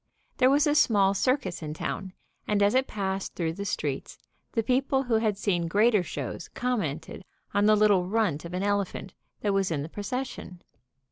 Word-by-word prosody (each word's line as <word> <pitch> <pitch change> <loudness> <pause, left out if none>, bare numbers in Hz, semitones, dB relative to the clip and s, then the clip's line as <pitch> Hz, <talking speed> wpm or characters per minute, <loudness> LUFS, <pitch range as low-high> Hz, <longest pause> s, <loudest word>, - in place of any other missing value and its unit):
There 255 - +5
was 285 +3 +4
a 295 - +3
small 200 -9 +4
circus 200 -4 0
in 155 -1 -5
town, 190 +3 -4 0.3
and 205 -1 +2
as 200 - +3
it 260 +1 +2
passed 195 -2 -3
through 165 -2 -1
the 200 +4 -5
streets - - -3 0.4
the 225 - +1
people 265 +3 +1
who 240 -4 +1
had 215 -3 0
seen 175 -5 0
greater 210 +4 +4
shows 175 0 -5
commented 190 - -3 0.3
on 205 +1 +3
the 215 - +6
little 205 -4 +4
runt 195 -8 0
of 170 +1 -6
an 185 - -1
elephant 200 -2 -1 0.3
that 205 -2 +1
was 195 -1 +1
in 150 -4 -1
the 155 - -7
procession. 205 -3 -5
200 Hz, 185 wpm, -27 LUFS, 180-225 Hz, 0.4 s, the